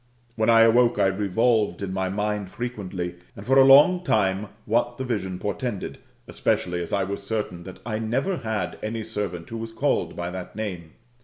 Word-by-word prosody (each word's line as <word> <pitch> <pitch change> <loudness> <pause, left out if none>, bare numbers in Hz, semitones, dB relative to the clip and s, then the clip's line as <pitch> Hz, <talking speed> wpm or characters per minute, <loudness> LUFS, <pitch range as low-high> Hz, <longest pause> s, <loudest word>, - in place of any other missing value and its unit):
When 110 +1 +1
I 115 -1 +7
awoke, 120 +1 +5
I - - +3
revolved 105 +3 +1
in 95 -1 -3
my 95 0 -1
mind 105 0 -2
frequently, 95 -7 -5 0.2
and 100 - -10
for 135 +2 +5
a - - +9
long 150 +7 +7
time, 100 - +1 0.2
what 120 +2 0
the 130 - -3
vision 100 -7 -2
portended, 105 +1 -4 0.3
especially 90 -1 0
as 85 - -6
I 100 -1 +1
was 100 +2 -4
certain 100 -4 -4
that 95 - -10
I 110 -2 -2
never 130 - -1
had 110 - -3
any 110 +1 -3
servant 100 -6 -4
who 115 - -5
was 115 0 -6
called - - 0
by 85 0 -4
that 90 0 -7
name. 90 -7 -5
105 Hz, 185 wpm, -25 LUFS, 95-115 Hz, 0.3 s, a